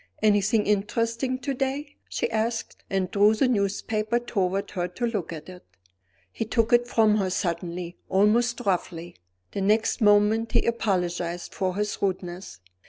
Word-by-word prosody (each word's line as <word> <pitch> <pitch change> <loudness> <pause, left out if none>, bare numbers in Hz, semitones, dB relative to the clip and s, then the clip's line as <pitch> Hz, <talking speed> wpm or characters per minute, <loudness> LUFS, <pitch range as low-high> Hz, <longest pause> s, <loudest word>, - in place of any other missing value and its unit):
"Anything 210 +1 +3
interesting 230 +5 0
to 275 +2 -2
day?" 275 +2 -3
she - - -1
asked 225 +1 -2
and 190 -2 -1
drew 210 +2 +4
the 255 +4 +2
newspaper 215 +1 0
toward 195 -5 -1
her 175 -2 -2
to 180 +7 -3
look 210 -9 -2
at 155 -2 -8
it. 180 -1 -11 0.7
He - - -3
took 230 +1 +1
it 240 0 +4
from 220 -3 +3
her 195 -3 0
suddenly, 175 -1 -3
almost 235 +5 +3
roughly. 175 - -2 0.3
The 200 - -3
next 215 +4 +2
moment 210 +2 +4
he - - +3
apologized 180 -6 -1
for 185 -1 -1
his 210 +1 -2
rudeness. 180 - -3
210 Hz, 150 wpm, -26 LUFS, 185-230 Hz, 0.7 s, drew